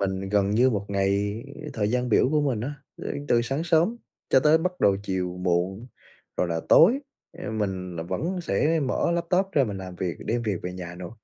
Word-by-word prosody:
Mình 95 0 -2
gần 100 -1 +2
như 120 +5 +4
một 100 -4 -2
ngày 100 +2 0 0.3
thời 105 -1 -1
gian 125 0 0
biểu 120 - +4
của 155 -1 +3
mình 130 -7 0
á, 135 +6 -4 0.3
ơ, - - -4 0.2
từ 120 0 +4
sáng 135 +7 -2
sớm 170 +7 +2 0.3
cho - - +6
tới 155 +2 +5
bắt 180 +2 -3
đầu 100 -1 +4
chiều 90 -2 -2
muộn 90 +5 0 0.5
rồi 90 - +1
là 80 -1 -1
tối, 220 +11 +7 0.3
a, - - -7
mình 95 -5 -3
là 80 - -3
vẫn 175 - -3
sẽ 165 -1 +1
mở 135 +4 0
laptop 175 +3 +1
ra 140 -5 +4
mình 100 -4 -4
làm 95 -1 -8
việc, 90 -1 -2
đem 120 +1 0
việc 105 -4 -1
về 90 - -4
nhà 90 -1 -7
nữa. 90 -1 -8
105 Hz, 215 wpm, -26 LUFS, 95-150 Hz, 0.5 s, tối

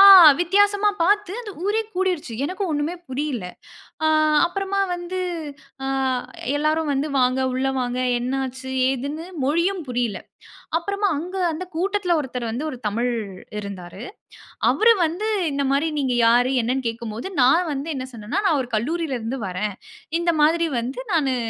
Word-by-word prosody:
ஆ - - +11 0.3
வித்தியாசமா 405 +3 +3
பார்த்து 410 +1 +2
அந்த 450 -4 -7
ஊரே 425 +2 +2
கூடிருச்சு. 360 -9 -1
எனக்கு 370 +7 -3
ஒண்ணுமே 295 +3 -1
புரியல. 260 -5 -3 0.6
ஆ - - +4 0.4
அப்புறமா 390 +2 -2
வந்து 350 +1 -4 0.6
ஆ - - -2 0.7
எல்லாரும் 310 +1 +1
வந்து, 275 +2 0
வாங்க 255 +1 +2
உள்ள 260 +1 0
வாங்க 250 0 -2 0.2
என்ன 250 +2 -2
ஆச்சு? 260 +1 -7 0.2
ஏதுன்னு, 285 +5 -4 0.2
மொழியும் 340 +7 +1
புரியல. 240 -4 -1 0.6
அப்புறமா 400 +3 -1
அங்க 360 +5 -5 0.2
அந்த 330 +4 -4
கூட்டத்துல 370 0 +1
ஒருத்தர் 250 -4 -4
வந்து 245 +7 -3
ஒரு 255 - -7
தமிழ் 235 +4 0 0.5
இருந்தாரு. 195 -1 -7 0.7
அவரு 460 +1 +5
வந்து 360 +7 -2 0.2
இந்தமாரி 280 +2 +1
நீங்க 260 -3 0
யாரு? 245 +2 +4
என்னன்னு 255 +3 -1
கேட்கும் 230 -1 -4
போது, 235 +12 -5 0.2
நான் 325 +7 +4
வந்து 275 +3 -4
என்ன 255 0 -4
சொன்னேன்னா, 230 - -2
நான் 310 -6 +3
ஒரு 245 - -7
கல்லூரியிலருந்து 265 -1 -2
வர்றேன். 190 +2 -3 0.4
இந்த 340 0 +2
மாதிரி 330 +2 +4
வந்து 245 +3 -4
நானு, 275 -5 +2
290 Hz, 145 wpm, -23 LUFS, 250-350 Hz, 0.7 s, ஆ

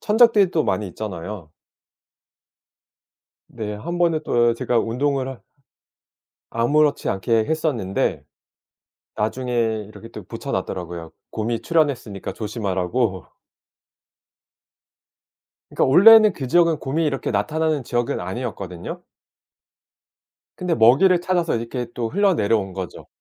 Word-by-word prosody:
천적들이 215 -3 +4
또 160 -4 +1
많이 105 - -1
있잖아요. 90 -2 -7 2.0
네. 105 -3 -6
한번은 170 +7 0
또 120 -1 +2
제가 120 0 0
운동을 130 +4 -1
하 135 -2 -8 1.1
아무렇지 145 +6 +2
않게 110 +4 +1
했었는데 135 - -1 0.9
나중에 110 -1 -1
이렇게 115 +1 -12
또 115 - -10
붙여 - - -7
놨더라고요. 85 -2 -4 0.2
곰이 115 +1 -2
출현했으니까 140 - -1
조심하라고. 100 -1 -2 2.4
그러니까 - - +1
원래는 215 +8 +8
그 135 -7 -6
지역은 165 +3 +3
곰이 155 +4 -1
이렇게 135 -2 -2
나타나는 150 +7 0
지역은 120 0 -1
아니었거든요. 95 -3 -6 1.5
근데 180 -2 -1
먹이를 155 +11 +5
찾아서 175 -6 0
이렇게 115 +1 -4
또 115 -2 -2
흘러 195 - +2
내려온 100 - 0
거죠. 95 -2 -7
120 Hz, 275 characters per minute, -22 LUFS, 105-155 Hz, 2.4 s, 원래는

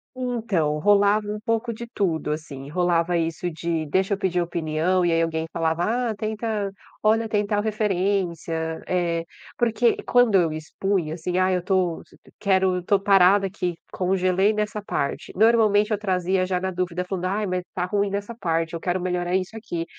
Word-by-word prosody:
Então, 220 -12 -1
rolava 205 +3 +3
um 210 0 -3
pouco 230 +1 -1
de 235 +2 -7
tudo, 170 -9 -1
assim. 140 -3 -6
Rolava 175 +1 +1
isso 165 +1 -1
de, 165 0 -2
deixa 190 +6 +1
eu - - -11
pedir 180 -3 0
opinião, 170 +2 0
e 170 - +2
aí 165 0 +2
alguém 160 -1 -1
falava: 165 +1 0 0.3
"Ah, - - -5
tenta 215 -1 -2 0.3
olha 220 +1 +3
tem 210 -1 +1
tal 205 0 0
referência", 185 -6 -1
eh, 170 -2 0 0.3
porque 235 0 +2
quando 245 -3 +4
eu 170 -4 +4
expunha, 160 +1 -2
assim: 175 +2 -3
"Ah, 185 0 +3
eu 180 - +1
estou 180 -2 0 0.4
quero 190 -2 +2
estou 195 +2 +2
parada 195 0 +5
aqui, 180 -2 -3 0.2
congelei 185 +2 +2
nessa 210 0 -2
parte", 140 -8 -3
normalmente 215 -1 +4
eu 210 - +2
trazia 185 -2 0
já 180 -1 -1
na 190 0 -2
dúvida 180 0 -2
falando: 185 -1 -3
"Ai, 205 +3 0
mas 185 -1 -1
está 180 -1 -3
ruim 200 +1 0
dessa 205 +3 -4
parte, 165 -5 -1
eu 165 - -3
quero 180 +1 -1
melhorar 180 0 -1
isso 190 +4 -2
aqui". 175 -7 -4
185 Hz, 175 wpm, -24 LUFS, 170-205 Hz, 0.4 s, parada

